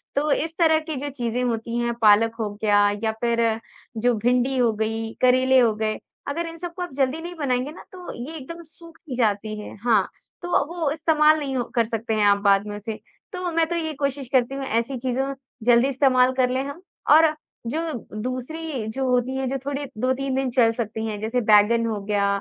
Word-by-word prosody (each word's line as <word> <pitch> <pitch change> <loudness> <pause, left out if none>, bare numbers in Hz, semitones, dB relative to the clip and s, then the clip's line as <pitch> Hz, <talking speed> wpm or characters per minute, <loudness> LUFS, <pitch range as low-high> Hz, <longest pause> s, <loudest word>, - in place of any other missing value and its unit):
तो 295 +2 +1
इस 320 +3 0
तरह 320 -2 +4
की 315 -1 -6
जो 285 +2 -4
चीज़ें 245 -2 -2
होती 230 -1 -2
हैं 235 0 0
पालक 225 +1 +5
हो 215 -2 -1
गया 205 -1 +4
या 220 - +2
फिर 235 -1 +1 0.6
जो 245 +1 +3
भिंडी 250 +4 +1
हो 240 -2 +3
गई, 225 +1 -3
करेले 255 +1 +5
हो 235 -3 +4
गए 215 0 -1 0.3
अगर 335 +4 -2
इन 330 0 -8
सबको 350 +1 -6
आप 355 - -4
जल्दी 275 +3 0
नहीं 350 +1 -7
बनाएँगे 270 -3 -1
ना 315 - -12
तो 365 -2 -8 0.2
ये 325 - -7
एकदम 335 +4 -9
सूख-सी 330 -3 -11
जाती 215 -2 0
है। 210 - -8
हाँ, 240 -2 +3 0.3
तो 350 - -6 0.2
वो 330 -4 -1
इस्तेमाल 310 0 +3
नहीं 275 -3 -3
हो 245 - +1
कर 235 - +4
सकते 225 0 -3
हैं 215 -1 +2
आप 200 0 +5
बाद 200 0 +4
में 205 - -5
उसे, 215 +2 -5 0.4
तो 365 -1 -3
मैं 330 0 +2
तो 345 - -1
ये 320 -2 -2
कोशिश 280 -1 -2
करती 260 +1 +2
हूँ 275 0 -4
ऐसी 235 +2 -1
चीज़ों 260 +2 -1 0.3
जल्दी 240 +1 +5
इस्तेमाल 260 -2 +3
कर 250 - +3
लें 260 +1 0
हम। 285 +5 -8 0.3
और 320 +2 +8 0.4
जो 300 +7 -1 0.4
दूसरी 255 +2 -4
जो 265 +5 -2
होती 250 +1 +1
है 265 0 -1
जो 270 +2 -1
थोड़ी 285 0 -3
2-3 260 +2 0
दिन 265 -1 0
चल 235 -2 +4
सकती 225 -1 -4
हैं 215 -2 -4
जैसे 225 +4 -1
बैंगन 215 +3 +5
हो 220 -2 -2
गया 205 -1 +1
255 Hz, 210 wpm, -23 LUFS, 225-295 Hz, 0.6 s, और